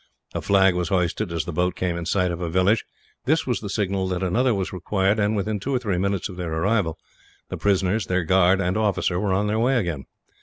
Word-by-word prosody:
A - - -3
flag 95 -1 +4
was 90 -1 -2
hoisted 90 -2 0
as 85 -1 -2
the 90 - -5
boat 90 +2 0
came 90 -2 -1
in 85 -1 -4
sight 90 -1 +1
of 85 0 -5
a 85 - -2
village. 95 +6 +2 0.4
This 155 +5 +2
was 125 -3 -1
the 105 - -6
signal 95 -2 -1
that 90 0 -2
another 120 +8 +2
was 95 -1 -3
required 95 +3 0
and, 105 +1 +1
within 105 +1 -1
two 135 +7 -2
or - - +3
three 105 -7 -1
minutes 100 -1 -1
of 95 - -10
their 90 -3 -4
arrival, 80 0 0 0.5
the - - -4
prisoners, 100 +1 +1
their 95 -1 +1
guard 95 +2 +4
and 95 +1 0
officer 100 -4 0
were 100 0 0
on 100 +2 +1
their 105 +1 0
way 125 +3 +2
again. 85 - -2
95 Hz, 235 wpm, -23 LUFS, 90-105 Hz, 0.5 s, flag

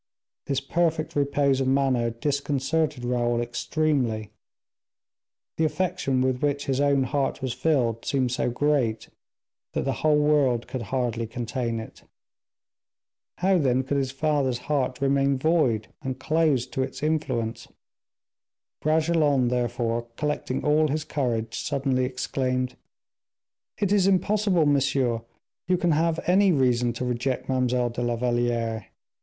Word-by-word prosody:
This 135 -1 0
perfect 165 +2 0
repose 140 -1 +2
of 130 - 0
manner 130 -3 +2
disconcerted 140 +2 -1
Raoul 120 -1 0
extremely; 120 -2 -1 1.3
the 160 - +1
affection 160 -5 0
with 130 -1 0
which 145 -1 0
his 135 0 0
own 140 -1 +3
heart 140 +1 -1
was 130 -2 -1
filled 120 -8 0
seemed 130 -3 0
so 125 - 0
great 125 -3 0 0.6
that - - -1
the 135 - 0
whole 155 -1 +4
world 145 -5 +2
could 130 - -4
hardly 120 -3 -1
contain 115 0 -3
it. 110 - -10 1.4
How, 190 0 +3
then, 130 -3 +2
could 140 +2 -1
his 135 -2 0
father's 135 -2 0
heart 130 -1 -1
remain 140 0 +2
void, 130 -8 +1
and 130 -1 -4
closed 150 -4 +1
to 135 - -1
its 130 +2 -4
influence? 130 -8 -1 1.1
Bragelonne, 155 -4 +2
therefore, 120 -1 -1
collecting 150 -3 -2
all 150 +1 +4
his 155 +2 -1
courage, 120 -7 -2
suddenly 135 -3 0
exclaimed, 130 0 -2 1.0
"It 200 -2 0
is 200 -2 +4
impossible, 195 -2 +2
monsieur, 135 -4 +1 0.5
you 180 0 +3
can 175 -1 +1
have 160 +2 +1
any 190 +2 +4
reason 125 -5 +2
to 125 +2 -4
reject 125 +1 -2
Mademoiselle 125 -2 +1
de 120 - -4
la 120 -1 0
Valliere! 120 -2 -1
135 Hz, 130 wpm, -25 LUFS, 120-150 Hz, 1.4 s, whole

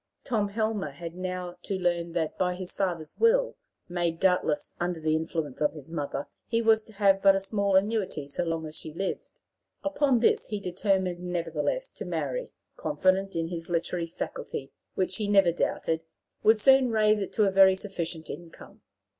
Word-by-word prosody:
Tom 215 -5 0
Helmer 215 -5 -1
had 165 +4 -8
now 180 0 -4
to 195 - -3
learn 170 -2 0
that, 160 -2 -1
by 180 -1 0
his 185 0 -6
father's 170 -6 -3
will, - - +4 0.3
made 175 -2 -1
doubtless 180 -6 +1
under 175 -1 -1
the 155 0 +1
influence 160 -3 -3
of 150 - +2
his 150 0 -11
mother, 145 -3 -3 0.2
he 230 - +1
was 225 -1 +4
to 220 - -14
have 195 -1 +3
but 195 -1 +6
a - - +2
small 200 0 0
annuity 195 -6 +1
so 140 +5 -2
long 165 -1 -2
as 155 0 -6
she 155 - -4
lived. 190 +5 -3 0.5
Upon 290 -4 +2
this 230 - +2
he 210 - -3
determined 185 -1 0
nevertheless 175 - -2
to - - -7
marry, - - -3 0.3
confident 190 +1 +1
in 165 0 -1
his 170 -1 -5
literary 170 0 -1
faculty, 140 -4 -5 0.2
which, 185 0 0
he 210 - -2
never 195 -4 +5
doubted, 160 -1 -1 0.4
would 220 0 +5
soon 265 +2 +6
raise 215 -1 +3
it 195 - -3
to 215 - +3
a - - +2
very 190 0 +7
sufficient 170 -5 -4
income. 170 -1 -10
185 Hz, 180 wpm, -28 LUFS, 165-205 Hz, 0.5 s, very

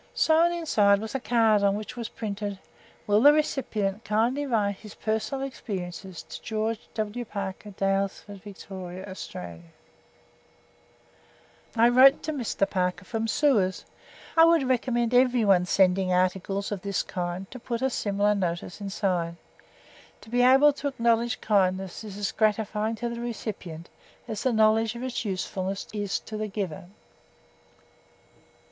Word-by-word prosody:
Sewn 330 +2 +4
inside 215 -13 +3
was 220 +3 -6
a 270 - -1
card 225 -4 +3
on 200 0 +3
which 215 +4 -6
was 235 -2 -5
printed: 205 -2 -4 0.5
"Will 205 +1 +3
the 290 +3 +9
recipient 225 -9 -1
kindly 240 +7 0
write 205 -5 0
his 210 0 -12
personal 220 +5 -2
experiences 190 -7 -6
to - - -10
George 220 0 -2 0.2
W. 220 +2 -3
Parker, 200 -1 -6
Daylesford, 195 0 -2
Victoria, 190 -2 -8
Australia." 85 - -8 2.1
I 230 +1 +5
wrote 265 +3 +6
to 310 - -2
Mr. 235 -7 -1
Parker 180 -1 -1
from 225 +1 -2
Suez. 220 -8 +2 0.5
I 325 - +7
would 330 -5 +4
recommend 240 -2 0
everyone 230 -8 +4
sending 190 0 +3
articles 190 +2 0
of 200 -3 -3
this 200 -1 -1
kind 180 +1 -4
to 255 - -8
put 235 +1 -4
a 265 - +3
similar 205 -1 +1
notice 180 0 -3
inside. 185 -4 -1 0.9
To 220 - -15
be 245 0 +2
able 270 +4 +6
to 285 - -1
acknowledge 235 -3 +1
kindness 190 -2 0
is 205 -2 -8
as 205 -1 -2
gratifying 215 0 0
to 235 +2 -3
the 235 0 -5
recipient 200 -8 -6 0.4
as 215 -2 -4
the 260 - +1
knowledge 220 0 +3
of 235 - -6
its 255 -2 -3
usefulness 190 -1 -3
is 205 -2 -2
to 215 - -7
the 215 0 -2
giver. 195 -5 -5
210 Hz, 140 wpm, -26 LUFS, 195-240 Hz, 2.1 s, the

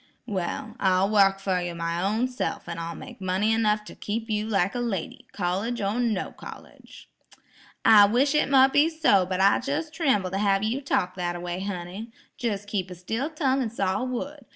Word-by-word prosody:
"Well, 210 +1 -4
I'll 190 +1 +2
wark 195 -2 +4
fer 190 -2 0
you 175 -1 -4
my 170 +1 -2
own 215 +6 +1
self, 255 -7 -4
and 170 -1 -5
I'll 165 0 -5
make 250 -5 -11
money 190 +4 +1
enough 215 -1 +1
to - - -11
keep 225 +2 -4
you 210 0 -1
like 195 -3 +1
a 245 - -3
lady, 210 -8 -4
college 200 +7 -2
or 205 +3 -1
no 225 -6 -1
college." - - -13 0.8
"I 215 -2 +8
wish 260 +7 +2
it 300 - +2
mote 265 -1 +5
be 295 +3 +5
so; 295 - +3
but 185 0 -2
I 195 +1 +5
jes' 300 +4 -2
trimbles 265 - +1
to 195 - -2
have 200 -1 +2
you 235 +6 -1
talk 180 -9 0
that 175 -1 -2
a - - -5
way, 175 +1 -4
honey; 190 +3 -5 0.3
jes' 205 -4 -2
keep 195 -3 -3
a 180 - -8
still 225 - -3
tongue 275 -4 0
and 230 -4 -2
saw 195 +1 -1
wood. 265 +2 -5
210 Hz, 200 wpm, -26 LUFS, 185-245 Hz, 0.8 s, I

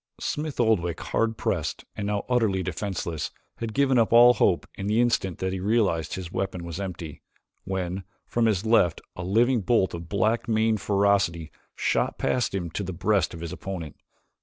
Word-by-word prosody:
Smith 150 -2 -3
Oldwick, 90 -8 +2
hard 115 -1 -1
pressed - - -2
and 100 -1 -3
now 105 -1 -1
utterly 110 -7 +1
defenseless, 85 -3 -3 0.3
had 115 -1 -4
given 135 +1 +3
up 115 - +2
all 120 +1 +8
hope 95 -6 +2
in 95 - -5
the 105 +2 +2
instant 115 -7 +1
that 95 0 -2
he 95 - -3
realized 100 -5 +1
his 90 -2 -6
weapon 95 -3 -3
was 85 +1 -6
empty, 85 -6 -6 0.4
when, 95 0 -3 0.2
from 120 -1 +1
his 105 -2 0
left, 110 -7 +3 0.2
a 90 - -5
living 115 +6 +3
bolt 100 -2 +2
of 85 -1 -7
black 110 +4 +1
maned 110 -2 +2
ferocity 100 -6 +1 0.2
shot - - 0
past 125 -5 0
him 85 -4 -3
to 100 - -3
the 95 -1 -4
breast 95 0 +1
of 80 - -9
his 85 -1 -5
opponent. 90 -6 -6
100 Hz, 180 wpm, -26 LUFS, 90-115 Hz, 0.4 s, all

